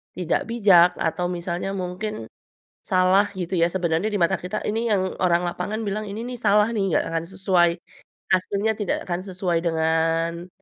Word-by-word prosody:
tidak 180 -2 -1
bijak 195 -7 +5
atau 170 +2 -1
misalnya 175 +2 -3
mungkin 195 +3 -4 0.6
salah 190 +2 +3
gitu 180 +1 -3
ya. 170 - +4
Sebenarnya 175 +2 0
di 205 - 0
mata 170 +3 +3
kita, 185 +4 -5
ini 225 +2 -1
yang 190 -3 0
orang 175 -1 +2
lapangan 180 +5 -3
bilang 210 +2 -2
ini 205 +3 -5
nih 250 0 -6
salah 210 -1 +4
nih, 195 -3 0
nggak - - +1
akan 165 0 -2
sesuai, 185 -2 +2 0.7
aslinya 200 +3 -1
tidak 205 -4 -1
akan 175 0 -1
sesuai 185 -2 -1
dengan 165 +1 0
185 Hz, 165 wpm, -23 LUFS, 170-205 Hz, 0.7 s, bijak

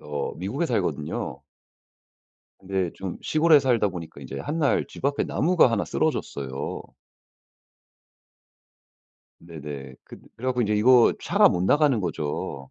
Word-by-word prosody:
어 75 -1 -4
미국에 - - -3
살거든요. 70 -2 -3 1.2
근데 95 -2 -2
좀 95 -2 -6
시골에 155 -1 +4
살다 120 -6 +2
보니까 85 -6 -8
인제 70 +1 -7
한날 150 - 0
집 - - -13
앞에 140 +1 +1
나무가 170 -6 +3
1 115 - 0
쓰러졌어요. 70 -1 -3 2.6
네네. 75 -5 -9
그 - - -12 0.2
그래 125 - -6
갖고 125 -1 +1
인제 105 0 0
이거 120 +3 +5
차가 - - +4
못 90 - -1
나가는 140 +2 +3
거죠. 75 -5 -4
95 Hz, 250 characters per minute, -25 LUFS, -, 2.6 s, 이거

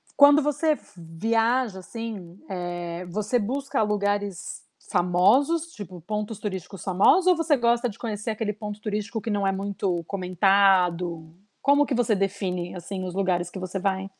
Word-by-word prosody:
Quando 290 +1 +7
você 300 +2 +1 0.2
viaja, 225 +6 0
assim, 200 -4 -7
eh, 175 -1 -4
você 210 +7 -1
busca 270 +4 -1
lugares 205 -2 -2 0.3
famosos, 215 - +3
tipo, 185 -4 -9
pontos 210 +3 -4
turísticos 190 -2 -6
famosos, 200 - +4
ou 365 - +6
você 325 -2 +2
gosta 240 +1 +2
de 205 - -11
conhecer 220 -1 -3
aquele 215 -1 -2
ponto 210 0 -7
turístico 215 +1 -3
que 225 - -5
não 200 -1 0
é - - +3
muito 190 -3 -2
comentado? 180 -3 +2 0.3
Como 285 +1 +4
que 275 - -2
você 230 -3 +2
define, 190 -2 -2
assim, 185 +2 -5
os 180 -1 -5
lugares 180 -3 0
que 190 - -7
você 185 +1 -4
vai? 190 0 -1
200 Hz, 150 wpm, -25 LUFS, 180-230 Hz, 0.3 s, Quando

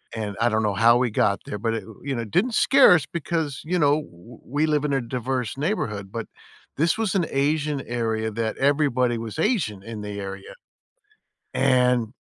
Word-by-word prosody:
and 105 -2 -4
I 120 - +4
don't 110 -1 0
know 105 -2 +1
how 115 +3 +5
we 125 0 +1
got 100 -2 +1
there, 105 - -5
but 115 +2 -1
i - - -1
it, - - -6 0.2
you 140 -1 -2
know, 115 -1 -3
didn't 195 - 0
scare 270 -8 +6
us 160 -5 +2
because, 160 -3 -3
you 180 +3 -1
know, 145 0 +3
w 115 - -15
we 145 +5 0
live 150 -2 +1
in 145 - 0
a 135 - +1
diverse 125 0 -3
neighborhood, 105 - -2
but 115 0 -5 0.5
this 165 +7 +2
was 220 -3 -1
an 180 -3 +2
Asian 145 +1 0
area 110 -2 -2
that 110 0 -3
everybody 135 -4 +2
was 115 +1 -6
Asian 160 - 0
in 110 0 -7
the 105 -1 -6
area, 95 0 -7 1.0
and 125 -2 +2
125 Hz, 195 wpm, -24 LUFS, 110-150 Hz, 1.0 s, scare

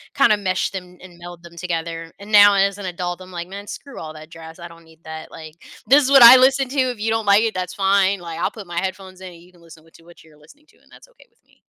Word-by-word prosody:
kinda 275 -7 +3
mesh 185 -2 -2
them 180 -2 -9
and 180 -2 -15
meld 175 0 -12
them 170 0 -15
together. 165 -1 -6
And 200 +2 -13
now 205 -1 +7
as 195 0 +1
an 205 - -8
adult, 175 0 -5
I'm 185 0 -13
like, 175 +1 -7
"Man, 200 +1 -10
screw 280 - -10
all 155 -1 -9
that 155 0 -13
jazz. 165 0 -13
I 170 0 -11
don't 165 0 -18
need 160 +1 -23
that." 160 0 -10
Like, 155 0 -12 0.3
"This 280 +3 +5
is - - -1
what 270 -3 +7
I 245 +2 +10
listen 265 0 +2
to. 275 0 -3
If 250 -4 -1
you 225 +1 -1
don't 225 -1 -2
like 200 +2 +4
it, 225 - -2
that's 185 -1 -5
fine." 195 0 +1
Like, 165 -1 -8
I'll - - -2
put 205 -5 -12
my 170 0 -4
headphones 190 0 -7
in 185 -2 -11
and 170 - -17
you 180 +1 -21
can 175 - -24
listen 165 -1 -17
what 165 - -25
to 165 - -19
what 170 0 -19
you're 155 -2 -22
listening 285 - -22
to, - - -28
and - - -30
that's - - -19
okay - - -23
with - - -43
me. - - -32
185 Hz, 295 wpm, -19 LUFS, 170-205 Hz, 0.3 s, I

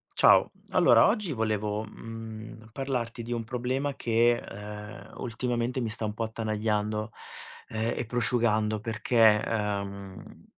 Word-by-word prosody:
Ciao. - - +6 0.2
Allora - - +6
oggi 205 -6 0
volevo, 110 -2 -1
mhmm, 110 0 -9
parlarti 120 -3 -3
di 120 - -7
un 115 -1 -2
problema 130 +4 -2
che, 120 +1 +3
ehm, 105 0 -9
ultimamente 120 +1 -2
mi 115 - -1
sta 110 0 -1
un 105 - -2
po' 115 - -3
attanagliando, 110 -1 -1 0.6
e 115 +2 -2
prosciugando 110 -2 +1
perché, 110 -1 +4
ehm, 100 -3 -4
110 Hz, 120 wpm, -28 LUFS, 105-120 Hz, 0.6 s, Ciao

